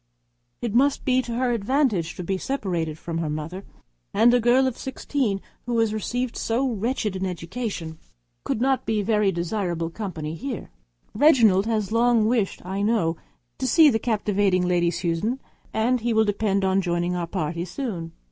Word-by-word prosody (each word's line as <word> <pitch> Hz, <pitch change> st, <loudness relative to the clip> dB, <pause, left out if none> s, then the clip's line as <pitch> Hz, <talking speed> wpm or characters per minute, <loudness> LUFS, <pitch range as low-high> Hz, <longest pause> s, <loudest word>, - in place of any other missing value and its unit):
It 235 Hz, -4 st, -1 dB
must 275 Hz, +4 st, +2 dB
be 255 Hz, -1 st, +3 dB
to 235 Hz, -2 st, -5 dB
her 250 Hz, 0 st, +1 dB
advantage 225 Hz, -, +1 dB
to 180 Hz, -, -5 dB
be 190 Hz, +2 st, -2 dB
separated 175 Hz, -, -2 dB
from 165 Hz, 0 st, -4 dB
her 160 Hz, -2 st, -2 dB
mother, 155 Hz, +6 st, -5 dB, 0.5 s
and 240 Hz, +1 st, +5 dB
a 245 Hz, -, +5 dB
girl 245 Hz, +3 st, +4 dB
of 260 Hz, -3 st, -1 dB
sixteen 260 Hz, -6 st, -2 dB, 0.3 s
who 240 Hz, -1 st, 0 dB
has 225 Hz, -2 st, +2 dB
received 245 Hz, +3 st, -2 dB
so 240 Hz, +4 st, 0 dB
wretched 225 Hz, -2 st, -1 dB
an 190 Hz, 0 st, -2 dB
education, 175 Hz, -2 st, -5 dB, 0.4 s
could -, -, -1 dB
not 265 Hz, 0 st, +1 dB
be 220 Hz, -1 st, +1 dB
a -, -, -5 dB
very 210 Hz, -2 st, +2 dB
desirable 170 Hz, -2 st, -2 dB
companion 165 Hz, -7 st, -5 dB
here. 255 Hz, -2 st, -5 dB, 0.4 s
Reginald 220 Hz, -7 st, +5 dB
has 215 Hz, -3 st, -1 dB
long 230 Hz, -1 st, +3 dB
wished, 220 Hz, -6 st, 0 dB
I 190 Hz, +2 st, -3 dB
know, 205 Hz, -7 st, +1 dB, 0.4 s
to 260 Hz, -, -1 dB
see 305 Hz, +3 st, +6 dB
the 225 Hz, -, +1 dB
captivating 205 Hz, -5 st, +1 dB
Lady 175 Hz, -1 st, +2 dB
Susan, 175 Hz, +9 st, -1 dB, 0.3 s
and 240 Hz, +2 st, +1 dB
we 240 Hz, -, -1 dB
shall 220 Hz, 0 st, +4 dB
depend 200 Hz, -2 st, 0 dB
on 190 Hz, 0 st, +2 dB
his 195 Hz, -, +1 dB
joining 175 Hz, +1 st, 0 dB
our 175 Hz, -1 st, -2 dB
party 170 Hz, -2 st, -2 dB
soon. 180 Hz, -, -5 dB
210 Hz, 175 wpm, -24 LUFS, 180-240 Hz, 0.5 s, see